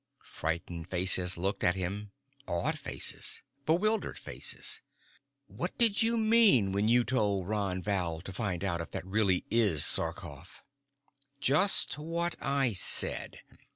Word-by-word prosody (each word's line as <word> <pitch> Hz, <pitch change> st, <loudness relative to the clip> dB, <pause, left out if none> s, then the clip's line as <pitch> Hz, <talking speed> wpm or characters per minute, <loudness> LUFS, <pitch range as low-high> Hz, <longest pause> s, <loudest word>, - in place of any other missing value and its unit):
Frightened 80 Hz, +1 st, -5 dB
faces 90 Hz, 0 st, +2 dB
looked 95 Hz, +3 st, -3 dB
at 90 Hz, -, +2 dB
him. 100 Hz, +3 st, -5 dB, 0.4 s
Awed 85 Hz, 0 st, -2 dB
faces. -, -, -3 dB, 0.2 s
Bewildered 215 Hz, +7 st, 0 dB
faces. -, -, -3 dB, 0.6 s
"What -, -, -6 dB
did 230 Hz, -4 st, +5 dB
you 230 Hz, +1 st, +2 dB
mean 215 Hz, -, +5 dB
when 100 Hz, +2 st, -1 dB
you 120 Hz, +1 st, +3 dB
told 105 Hz, -7 st, -1 dB
Ron 100 Hz, -4 st, -3 dB
Val 90 Hz, -6 st, -3 dB
to 95 Hz, -, -9 dB
find 95 Hz, -3 st, -4 dB
out 85 Hz, -4 st, -2 dB
if 85 Hz, -, -8 dB
that -, -, -7 dB
is 95 Hz, -, -15 dB
really 100 Hz, -4 st, 0 dB
Sarkoff?" 105 Hz, -10 st, +1 dB, 0.8 s
"Just 150 Hz, +3 st, +4 dB
what 170 Hz, +2 st, -3 dB
I 135 Hz, -4 st, +1 dB
said. 95 Hz, -, +1 dB
100 Hz, 130 wpm, -29 LUFS, 90-140 Hz, 0.8 s, did